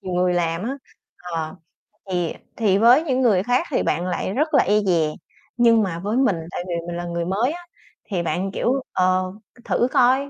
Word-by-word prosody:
nhiều 185 -3 -6
người 180 0 +2
làm 170 0 0
á, 265 +5 -3 0.5
ờ, 165 -1 -4 0.6
thì 175 -2 -1 0.2
thì 205 -4 +2
với 240 +8 +6
những 260 -4 0
người 205 -7 +3
khác 250 +7 +1
thì - - +1
bạn 170 +4 0
lại 185 +1 -2
rất 305 +6 0
là 275 - +5
e 210 +1 +3
dè, 170 -6 +2 0.5
nhưng 230 -2 +5
mà 175 -4 -3
với 210 +6 -2
mình, 260 -9 +3 0.2
tại 175 - -4
vì 175 - -3
mình 175 - -4
là 175 - -4
người 170 0 -3
mới 215 - 0
á, 350 - -7 0.5
thì 180 -3 0
bạn, 180 +4 -2
kiểu: 265 +6 0
"Ờ, 185 0 +2 0.4
thử 245 - +1
coi 260 +3 +3
195 Hz, 205 wpm, -22 LUFS, 175-245 Hz, 0.6 s, với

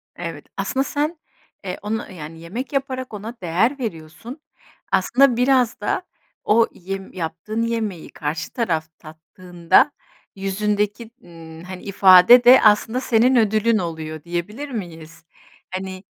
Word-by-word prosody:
Evet, - - -7
aslında 270 0 -1
sen, 300 +4 -2 0.4
eee, 185 -1 -5
onu, 215 0 -4
yani, 160 -2 -9
yemek 230 - -6
yaparak 260 -3 -3
ona 215 +3 -7
değer 190 - 0
veriyorsun, 220 - -7 0.5
aslında 255 -1 +3
biraz 250 -2 +2
da 210 - -1 0.4
o 225 +2 +3
yem 195 +1 -7
yaptığın 180 +6 -4
yemeği 220 -7 -3
karşı 150 +2 -5
taraf 170 -10 -1
tattığında, 175 - 0 0.4
yüzündeki, 210 +3 -2
ımm, 165 -1 -12
hani, 185 0 -9
ifade 195 +4 +7
de 250 +2 +8
aslında 220 +3 +3
senin 250 +1 +3
ödülün 220 0 +2
oluyor, 160 -3 -5
diyebilir 190 +12 -5
miyiz? 165 - -8 0.5
Hani, 185 0 -6
205 Hz, 120 wpm, -21 LUFS, 175-235 Hz, 0.5 s, de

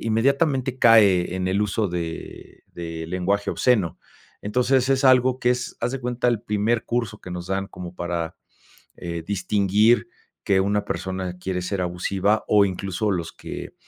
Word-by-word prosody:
inmediatamente 130 +3 +1
cae 100 -7 +5
en 90 0 -2
el 100 +2 +1
uso 105 +1 0
de 85 -2 -7
de 85 -1 -6
lenguaje 95 +3 -1
obsceno. 105 - +1 0.4
Entonces 125 +4 +1
es 135 +1 +2
algo 130 -1 +5
que 125 - +2
es, 125 -1 -2
haz 120 +2 -1
de 135 - -4
cuenta 125 0 -1
el 120 -3 0
primer 105 +2 0
curso 115 -3 -2
que 90 - -10
nos 90 0 -5
dan 95 0 -1
como 90 0 -9
para 85 -2 -3 0.6
eh, 85 -1 -5
distinguir 100 +4 +2 0.3
que 95 -1 +3
una 100 +1 0
persona 95 -1 -4
quiere 90 0 -3
ser 95 +2 -3
abusiva 95 +4 0
o 105 -1 +5
incluso 100 +2 -2
los 85 -3 -3
que, - - -8
100 Hz, 160 wpm, -23 LUFS, 90-120 Hz, 0.6 s, cae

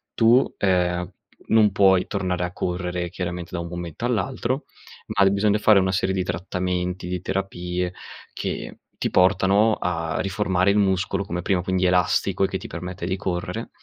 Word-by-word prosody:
tu, 120 +3 +4
ehm, 90 -1 +1 0.4
non 110 -2 +5
puoi 95 -2 +4
tornare 90 -1 -2
a 90 - -5
correre, 90 -1 -3
chiaramente, 90 -1 -5
da 85 - -2
un 85 - -4
momento 85 +5 -5
all'altro, 125 +3 -1 0.4
ma 100 -1 +3
bisogna 105 +1 +2
fare 105 -1 +5
una 95 0 +1
serie 95 0 0
di 95 - 0
trattamenti, 90 0 -3
di 90 0 -3
terapie 90 -2 -3 0.4
che - - -5 0.2
ti - - -2
portano 100 +3 +4
a 80 -2 -2
riformare 95 -1 +1
il 105 - +2
muscolo 95 0 +1
come 90 -2 -4
prima, 95 -3 +1
quindi 95 0 0
elastico 90 +2 +2
e - - +4
che 95 - -3
ti - - -11
permette 90 +1 -6
di 95 +1 -1
correre 90 -3 -3
95 Hz, 165 wpm, -23 LUFS, 90-100 Hz, 0.4 s, non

